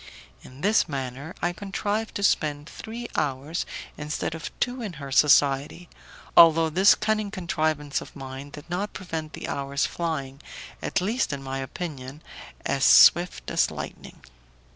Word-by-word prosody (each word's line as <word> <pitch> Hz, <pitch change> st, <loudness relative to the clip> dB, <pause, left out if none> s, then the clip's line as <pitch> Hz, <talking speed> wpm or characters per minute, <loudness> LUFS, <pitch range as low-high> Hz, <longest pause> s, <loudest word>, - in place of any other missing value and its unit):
In 130 Hz, +2 st, -14 dB
this 205 Hz, -1 st, +3 dB
manner 135 Hz, +3 st, -5 dB
I 175 Hz, 0 st, +1 dB
contrived 205 Hz, +4 st, -3 dB
to 200 Hz, -, -3 dB
spend 150 Hz, -5 st, +1 dB
three 235 Hz, +6 st, -7 dB
hours 145 Hz, +2 st, -2 dB, 0.3 s
instead 150 Hz, +1 st, -3 dB
of 165 Hz, -1 st, -6 dB
two 245 Hz, +1 st, -1 dB
in 210 Hz, -5 st, -5 dB
her 140 Hz, -3 st, -8 dB
society, 145 Hz, +4 st, +3 dB, 0.5 s
although 165 Hz, -1 st, +7 dB
this 190 Hz, +5 st, +6 dB
cunning 215 Hz, -1 st, 0 dB
contrivance 155 Hz, -6 st, -1 dB
of -, -, -12 dB
mine 135 Hz, 0 st, -8 dB
did 150 Hz, +2 st, -11 dB
not 185 Hz, +4 st, -3 dB
prevent 160 Hz, -4 st, -5 dB
the -, -, -6 dB
hours 140 Hz, 0 st, -1 dB
flying, 140 Hz, -5 st, -4 dB, 0.4 s
at 200 Hz, -, -1 dB
least 220 Hz, +5 st, 0 dB
in 140 Hz, -1 st, -5 dB
my 135 Hz, 0 st, -4 dB
opinion, 140 Hz, -1 st, -6 dB, 0.4 s
as 135 Hz, -1 st, 0 dB
swift 175 Hz, +5 st, +6 dB
as -, -, +2 dB
lightning. -, -, -9 dB
155 Hz, 145 wpm, -25 LUFS, 140-185 Hz, 0.5 s, although